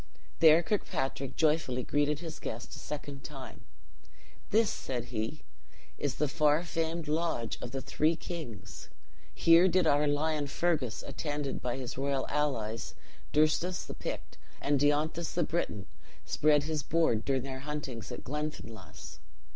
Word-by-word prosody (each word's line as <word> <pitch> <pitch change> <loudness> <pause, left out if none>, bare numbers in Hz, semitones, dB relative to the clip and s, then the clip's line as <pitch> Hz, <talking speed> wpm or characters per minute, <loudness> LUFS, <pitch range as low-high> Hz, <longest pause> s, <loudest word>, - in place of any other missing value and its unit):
There 160 +1 +8
Kirkpatrick 135 - -1
joyfully 150 -6 +2
greeted 145 +2 +1
his 165 -2 -6
guest 115 +1 -5
a - - -9
second 145 -2 -6
time: 135 -4 -9 0.8
"This," 220 0 +4
said 125 -3 -3
he, 115 +7 -3 0.6
"is 145 -3 -1
the 150 - +1
far 150 +3 +3
famed 165 -1 -2
lodge 155 -7 -1
of 120 - -4
the 135 +2 -4
three 155 +2 +2
kings: 115 - -7 0.5
here 165 +2 +7
did 185 0 +3
our 145 +1 +4
lion, 145 0 +1
Fergus, 140 -8 0
attended 145 -3 -3
by 125 0 -1
his 130 -1 -5
royal 135 -1 0
allies, 115 -7 -1 0.4
Durstus 155 +4 +2
the - - -6
Pict, - - -6 0.2
and 145 -1 +2
Dionethus 150 +3 +1
the 175 - +3
Briton, 105 - -2 0.4
spread 150 -1 +3
his 155 0 -1
board 150 -9 +2
during 135 -2 +1
their 135 -1 -5
huntings 140 -5 -5
in - - -5
Glenfinlass! 125 - -6
145 Hz, 140 wpm, -31 LUFS, 130-160 Hz, 0.8 s, There